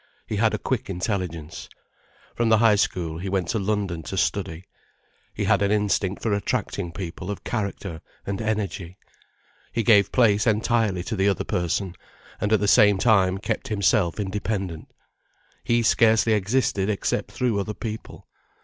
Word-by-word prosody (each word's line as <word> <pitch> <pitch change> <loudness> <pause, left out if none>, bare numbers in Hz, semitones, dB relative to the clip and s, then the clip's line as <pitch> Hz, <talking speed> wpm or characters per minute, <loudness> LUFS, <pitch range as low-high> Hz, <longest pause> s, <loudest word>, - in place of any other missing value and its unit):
He 105 - -3
had 110 +1 +2
a - - -2
quick 130 -6 -3
intelligence. 90 -4 -4 0.6
From 120 -1 0
the 110 - +6
High 110 -2 +5
School 85 -5 -1
he 95 +2 -4
went 95 -3 -1
to 110 - 0
London 100 -4 -1
to 95 +5 -6
study. 95 -3 -1 0.7
He - - -2
had 100 - +3
an 100 - +2
instinct 105 -2 0
for 110 - +1
attracting 100 -4 -2
people 90 +1 -6
of 105 - -5
character 100 -6 -4 0.2
and 100 +1 -3
energy. 100 -5 -3 0.7
He 115 - -1
gave 100 -2 +5
place 110 -3 +3
entirely 110 -4 +1
to 110 - -3
the 100 0 +2
other 100 - 0
person, 90 +2 -1 0.5
and 105 - -1
at 110 - +4
the 105 - 0
same 105 -2 +6
time 95 -4 +3
kept 110 +2 -3
himself 100 -3 +1
independent. 95 -4 -3 0.8
He 120 0 +2
scarcely 110 +1 +4
existed 105 -1 +1
except 105 - -1
through 120 -5 0
other 105 +2 -3
people. 110 -2 -7
100 Hz, 160 wpm, -24 LUFS, 95-110 Hz, 0.8 s, the